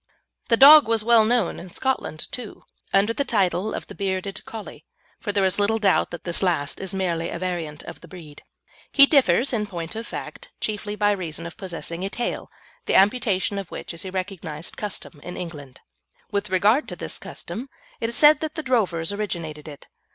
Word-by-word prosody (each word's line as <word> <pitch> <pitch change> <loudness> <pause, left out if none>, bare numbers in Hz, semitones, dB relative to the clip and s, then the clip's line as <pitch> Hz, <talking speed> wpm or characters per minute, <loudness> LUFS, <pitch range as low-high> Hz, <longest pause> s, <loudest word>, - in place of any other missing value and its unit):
The 230 - +4
dog 295 +2 +10
was 225 -1 +1
well 230 -1 +6
known 235 -4 +1
in 180 - -10
Scotland, 255 -8 -2
too, 245 -4 -7 0.3
under 200 +3 +3
the 280 - 0
title 200 -4 0
of - - -5
the - - -11
Bearded 195 0 -3
Collie, 220 -2 -9 0.4
for 205 - -2
there 200 -1 +2
is 190 +2 +1
little 215 +2 +2
doubt 200 -4 +2
that 175 - -8
this 170 -1 -1
last 165 -7 0
is 190 -2 -3
merely 170 -3 -1
a - - -4
variant 170 -4 -4
of - - -10
the - - -13
breed. 155 -5 -12 0.5
He 280 - +8
differs, 265 - +3
in 210 -3 0
point 170 0 -6
of 225 +1 -5
fact, - - -7
chiefly 210 -1 -3
by 205 0 +3
reason 170 -4 -4
of 170 - -7
possessing 175 -3 -5
a 195 - -1
tail, 240 +4 -3 0.4
the - - +2
amputation 200 -2 +3
of 195 - -7
which - - -6
is 170 - -5
a 190 - -5
recognised 180 -4 -5
custom 200 -6 -6
in 180 - -7
England. 145 -7 -8 0.5
With 200 0 -1
regard 205 +10 +3
to - - -6
this - - -5
custom, 255 +5 -7 0.3
it 230 - -1
is 235 - -3
said 300 0 +7
that 310 -1 -4
the 315 - -4
drovers 200 - +1
originated 170 -7 -4
it. 145 -2 -10
195 Hz, 195 wpm, -24 LUFS, 175-225 Hz, 0.5 s, dog